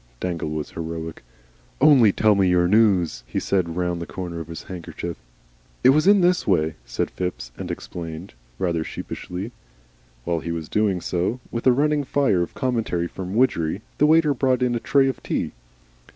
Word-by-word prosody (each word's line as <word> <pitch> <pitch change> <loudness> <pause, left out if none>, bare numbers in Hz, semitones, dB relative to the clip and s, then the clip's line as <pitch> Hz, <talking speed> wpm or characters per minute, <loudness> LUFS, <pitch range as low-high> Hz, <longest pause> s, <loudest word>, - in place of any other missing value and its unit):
Dangle 85 -4 -3
was 75 -1 -4
heroic. 80 -1 -6 0.6
"Only 130 -7 +6
tell 110 +2 +3
me 100 -2 +3
your 90 -1 +3
news," 95 - +3
he - - -2
said, 85 -4 0
round 90 -1 -1
the 85 - -5
corner 85 -2 -5
of 80 - -7
the 85 0 -8
handkerchief. 85 -1 -6 0.7
"It - - +7
was 155 +6 +4
in 200 -1 +6
this 180 +1 +2
way," 80 -5 +2
said - - -2
Phipps, 90 -9 -4
and - - -6
explained 85 +1 -6 0.2
rather 85 -3 0
sheepishly. 90 +6 -6 0.7
While 85 +2 -1
he 85 - -5
was 80 -2 -4
doing 100 -4 +1
so, 90 +9 -1
with 115 +2 -2
a - - +8
running 145 +3 +2
fire 130 -9 +2
of 85 - -4
commentary 115 -9 -1
from 95 +2 -6
Widgery, 85 -10 +1 0.2
the 150 - +5
waiter 155 -1 +5
brought 130 -1 +1
in 125 -1 +1
a 120 - 0
tray 135 +3 +3
of 130 - -3
tea. - - -2
95 Hz, 180 wpm, -23 LUFS, 85-125 Hz, 0.7 s, a